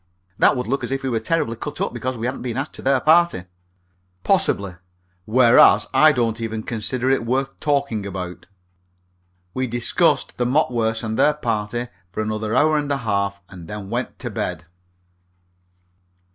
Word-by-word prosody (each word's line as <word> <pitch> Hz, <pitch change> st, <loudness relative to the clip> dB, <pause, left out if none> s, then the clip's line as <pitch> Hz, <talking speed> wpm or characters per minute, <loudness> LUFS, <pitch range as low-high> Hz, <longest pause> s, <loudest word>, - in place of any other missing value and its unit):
"That -, -, +4 dB
would 125 Hz, -, -2 dB
look 135 Hz, +4 st, -2 dB
as -, -, -3 dB
if 135 Hz, 0 st, -2 dB
we 135 Hz, -, -1 dB
were 115 Hz, -2 st, 0 dB
terribly 115 Hz, -1 st, -1 dB
cut -, -, -7 dB
up -, -, -2 dB
because 125 Hz, +1 st, -3 dB
we 115 Hz, -, -4 dB
hadn't 130 Hz, +2 st, -3 dB
been 125 Hz, -1 st, -4 dB
asked 135 Hz, +3 st, -3 dB
to -, -, -9 dB
their 135 Hz, 0 st, +2 dB
party." 165 Hz, -, +3 dB, 0.8 s
"Possibly. 95 Hz, -3 st, +1 dB, 0.5 s
Whereas, 115 Hz, -3 st, +6 dB
I 155 Hz, 0 st, +6 dB
don't 115 Hz, -4 st, -1 dB
even 110 Hz, -1 st, -4 dB
consider 120 Hz, +3 st, -3 dB
it 135 Hz, -, +1 dB
worth 135 Hz, +3 st, -2 dB
talking 140 Hz, -8 st, 0 dB
about." 90 Hz, -2 st, -7 dB, 1.1 s
We 130 Hz, 0 st, -1 dB
discussed 120 Hz, +1 st, 0 dB
the 125 Hz, -, +1 dB
Mopworths 120 Hz, -5 st, +1 dB
and 110 Hz, 0 st, -3 dB
their 150 Hz, -, +4 dB
party 115 Hz, -2 st, -2 dB, 0.2 s
for 110 Hz, -, -3 dB
another 110 Hz, 0 st, -2 dB
hour 155 Hz, 0 st, +3 dB
and 145 Hz, -1 st, -3 dB
a 140 Hz, -, +1 dB
half, 100 Hz, -4 st, -2 dB
and 90 Hz, -4 st, -12 dB
then 105 Hz, 0 st, -7 dB
went 120 Hz, +2 st, -3 dB
to -, -, -6 dB
bed. 85 Hz, -2 st, -4 dB
115 Hz, 170 wpm, -21 LUFS, 110-135 Hz, 1.1 s, Whereas